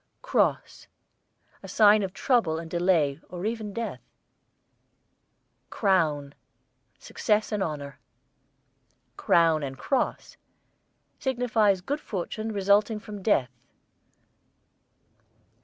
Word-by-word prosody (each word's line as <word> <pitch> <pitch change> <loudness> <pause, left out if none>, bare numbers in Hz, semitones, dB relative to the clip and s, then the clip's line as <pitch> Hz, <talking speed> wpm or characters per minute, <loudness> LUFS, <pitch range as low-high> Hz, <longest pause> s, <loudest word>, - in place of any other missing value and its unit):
CROSS, - - 0 0.7
a - - -10
sign 210 -1 +5
of 190 -2 -3
trouble 200 -7 +1
and 165 0 -8
delay 170 -5 +1
or 180 +2 -6
even 220 -2 -3
death. 230 +3 -5 1.7
CROWN, 155 -8 0 0.6
success 215 0 -1
and 210 -2 -1
honour. 145 -5 -4 1.2
CROWN 165 -2 +3
AND 135 -2 -5
CROSS, 265 - -2 0.8
signifies 225 -7 +1
good 285 +10 -3
fortune 215 +2 -4
resulting 205 +2 +2
from 210 -2 -9
death. 135 - +1
200 Hz, 90 wpm, -26 LUFS, 165-220 Hz, 1.7 s, sign